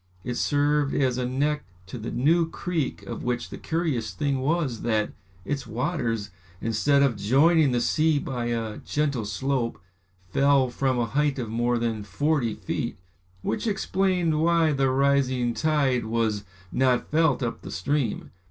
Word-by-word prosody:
It 125 - -3
served 145 +2 +1
as 130 -3 +1
a 125 - -1
neck 145 +4 0 0.2
to 95 +6 -7
the 115 +2 -5
new 165 +6 +2
creek 165 - -3
of 100 - -6
which 120 0 -2
the - - -6
curious 160 -9 -2
thing 140 -3 0
was 140 -4 0
that 110 -2 0 0.3
its 145 -2 -3
waters, 115 - -2 0.3
instead 115 +7 +2
of 125 -6 +1
joining 140 +8 +4
the 120 - +1
sea 155 +4 +2
by 125 -4 -3
a 115 -2 -2
gentle 140 -7 -1
slope, 120 -2 -1 0.5
fell 135 -1 +3
from 130 0 0
a 120 - +1
height 145 +4 0
of 120 -4 -3
more 120 +1 +1
than 115 -2 -1
forty 115 +4 0
feet, - - -3 0.5
which 115 - -2
explained 185 -5 +1
why 165 -1 +3
the 135 -2 +2
rising 130 -2 +2
tide 135 -2 +1
was 110 -2 0 0.3
not 130 -1 +1
felt 155 -5 +3
up 115 - -3
the - - -8
stream. 140 -5 -2
130 Hz, 155 wpm, -26 LUFS, 115-150 Hz, 0.5 s, joining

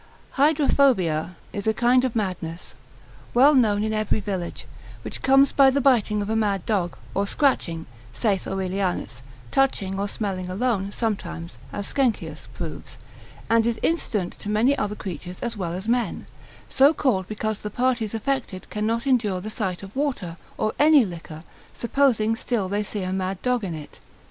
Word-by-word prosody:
Hydrophobia 270 - +3 0.2
is 205 +1 -4
a 220 - +2
kind 245 +2 +4
of 255 -3 -1
madness, 180 -5 -3 0.6
well 275 +5 +7
known 215 -6 +3
in 220 0 -1
every 215 0 0
village, 190 -4 -4 0.4
which - - -6
comes 270 +1 +5
by 275 -1 +6
the 275 +1 +1
biting 220 -6 +3
of 200 - -5
a - - +1
mad 205 -4 0
dog, 185 -6 0 0.2
or 200 +1 0
scratching, 180 - +1 0.3
saith 195 - 0
Aurelianus; 190 -8 -2 0.3
touching, 195 -8 +1
or 200 - 0
smelling 190 -3 -3
alone 200 0 0
sometimes 175 -7 -3
as 205 - -4
Sckenkius 255 -3 -1
proves, - - -7 0.5
and 230 0 +3
is 235 -1 0
incident 215 - 0
to 205 - -5
many 225 +7 +3
other 210 -6 -2
creatures 180 -2 -7
as 235 -1 -3
well 175 -5 -3
as 190 +4 -5
men: 240 0 0 0.4
so 275 +4 +5
called 195 -11 +1
because 215 0 -3
the 210 - -5
parties 235 -1 0
affected 230 -5 -3
cannot 225 +4 -1
endure 225 -8 +2
the 215 +4 -5
sight 190 -5 -2
of 195 +3 -10
water, 260 - -2 0.2
or 215 - 0
any 295 -4 +6
liquor, 165 -3 -8 0.3
supposing 235 -3 +2
still 225 -4 -1
they 205 +2 -1
see 205 -1 -4
a 185 0 -2
mad 190 0 -2
dog 250 -2 +1
in 175 -4 -3
it. 150 -2 -10
210 Hz, 165 wpm, -24 LUFS, 190-245 Hz, 0.6 s, well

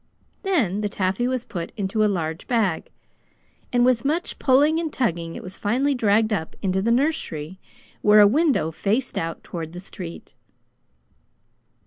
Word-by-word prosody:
Then 255 - +1
the 210 - -1
taffy 195 +4 0
was 255 -2 -1
put 170 -8 -6
into 205 +2 0
a 210 - +3
large 165 -4 -3
bag, 215 -10 0 0.8
and 245 0 +3
with 250 -2 +3
much 315 +5 -1
pulling 295 +5 +4
and 325 -2 -3
tugging 170 - -2
it - - -7
was 185 +1 -8
finally 260 +7 +1
dragged 220 -2 +2
up 160 -6 -3
into 190 0 +1
the 220 - 0
nursery, 210 - -1 0.4
where 210 0 +6
a 205 - +9
window 265 - +2
faced 215 +10 -1
out 165 0 -3
toward 165 -2 -6
the 175 - -7
street. 180 -2 -9
210 Hz, 155 wpm, -23 LUFS, 185-255 Hz, 0.8 s, a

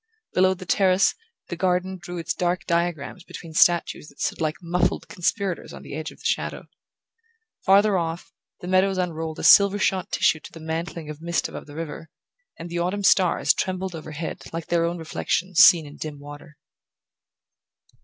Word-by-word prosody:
Below 185 +1 +3
the 185 - -10
terrace, 190 +2 +3 0.4
the - - -3
garden 185 +1 0
drew 175 -1 -7
its 165 - -2
dark 180 +1 -1
diagrams 170 0 -2
between 165 -2 -10
statues 170 -2 +3
that 140 - -18
stood - - -2
like 155 0 0
muffled 175 0 -1
conspirators 185 +1 -2
on - - -10
the - - -9
edge 155 +1 -4
of - - -15
the - - -18
shadow. - - -2 1.0
Farther 200 0 +4
off, 165 0 -5 0.3
the 175 - -7
meadows 185 +1 +2
unrolled 160 -3 -3
a - - -6
silver 200 0 +7
shot 190 -1 0
tissue 160 - +2
to - - -12
the 165 - -11
mantling 160 0 -5
of 150 +1 -11
mist 170 0 -1
above - - -9
the 145 - -12
river; 165 0 -6 0.5
and 165 - -7
the 170 0 -4
autumn 185 +4 -1
stars 185 -2 +4
trembled 185 0 -3
overhead 155 -2 -6
like 165 -1 -5
their 170 -1 +2
own 170 +1 -2
reflections 170 +2 -2
seen 165 -3 +8
in 145 - -12
dim 155 -2 -6
water. 145 +1 -12
170 Hz, 175 wpm, -24 LUFS, 160-185 Hz, 1.0 s, seen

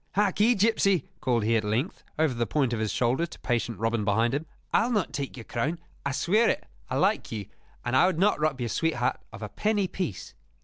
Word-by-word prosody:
"Harkee, 210 +4 +3
gipsy," 200 - +3
called 120 -3 +1
he 115 +2 +2
at 110 - +2
length, 110 - -1
over 155 -3 +2
the 120 -1 -1
point 135 -1 +1
of 115 - -1
his 110 -1 0
shoulder 130 +8 +1
to - - -12
patient 120 -2 -1
Robin 115 0 0
behind 115 +4 +2
him, 150 +3 -2 0.3
"I'll 235 +2 +3
not 210 - 0
take 135 -1 -4
your 115 - -7
crown, 140 +10 -2 0.3
I 140 - -1
swear 215 - +3
it! - - -1 0.2
I - - -1
like - - +1
you, 105 -3 -4 0.4
and 120 +1 0
I 175 - +6
would 185 - 0
not 195 +1 +3
rob 150 -3 0
your 120 -2 -2
sweetheart 130 -3 0
of 110 -1 -9
a 105 - -4
penny 205 - 0
piece. 175 - -4
135 Hz, 220 wpm, -27 LUFS, 115-185 Hz, 0.4 s, I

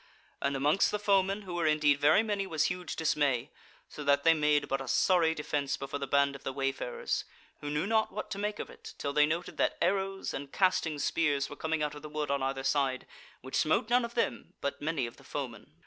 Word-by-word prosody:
And 140 0 0
amongst 145 +7 +3
the 210 - -1
foemen, 200 0 +2
who 185 -2 -7
were 170 -2 +1
indeed 150 -2 +3
very 150 +9 +5
many, 205 -3 -1
was 160 -4 0
huge 180 -1 -2
dismay, 145 -5 +1 0.4
so 150 - -8
that 140 0 +3
they 165 - +7
made 150 -2 +2
but 135 0 -1
a 135 - -7
sorry 165 +4 +3
defence 145 -2 -2
before 135 +1 -5
the 140 - -3
band 140 0 +3
of 140 - -10
the - - -2
wayfarers, 140 - -2 0.4
who 145 - -5
knew 150 +4 0
not 220 +1 +2
what - - -6
to 200 - -3
make 210 +1 -2
of - - -6
it, - - -12
till 140 - -3
they 150 0 +5
noted 170 +3 -3
that - - +1
arrows 195 +1 0
and 140 0 -6
casting 185 -5 +1
spears 145 -1 0
were - - -6
coming 160 -1 -1
out 150 -1 -1
of 150 - -9
the 150 - -8
wood 150 -1 -2
on 140 -1 0
either 135 0 -2
side, 135 -2 +1 0.4
which 130 - -11
smote 160 +9 +2
none 245 0 +4
of 235 0 -5
them, 235 - -2
but 140 0 -3
many 150 -4 -1
of 115 - -9
the - - -17
foemen. 120 - -6
150 Hz, 230 wpm, -30 LUFS, 140-185 Hz, 0.4 s, they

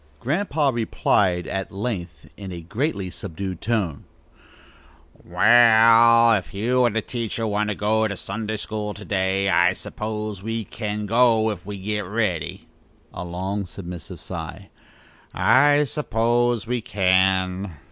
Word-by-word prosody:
Grandpa 150 - 0
replied 100 -6 +1
at 95 0 -4
length 95 -5 -5
in 100 -2 -8
a 85 -1 -7
greatly 100 - -3
subdued 95 -1 -6
tone: 100 -10 -2 1.2
"Wall, 115 +3 +6
if 100 -2 -2
you 125 +5 +2
and 115 -2 0
the 110 - 0
teacher 115 -2 -3
want 105 0 -1
to 105 - -2
go 105 +2 +1
over 110 - +2
to 100 -3 -5
Sunday 110 +3 -4
school 105 -1 -4
to 105 - -10
day, 95 0 0
I 90 -1 +4
suppose 105 0 -5
we 115 +2 -3
can 105 +1 -5
go 115 0 +3
if 95 -2 -8
we 105 -1 -5
get 105 +2 -3
ready," 90 -7 -2 0.5
a 90 - -6
long 95 +3 -4
submissive 90 -5 -9
sigh - - -7 0.6
"I 145 +3 +4
suppose 120 -4 0
we 120 +1 -2
can." 95 -2 +1
105 Hz, 135 wpm, -23 LUFS, 95-115 Hz, 1.2 s, Wall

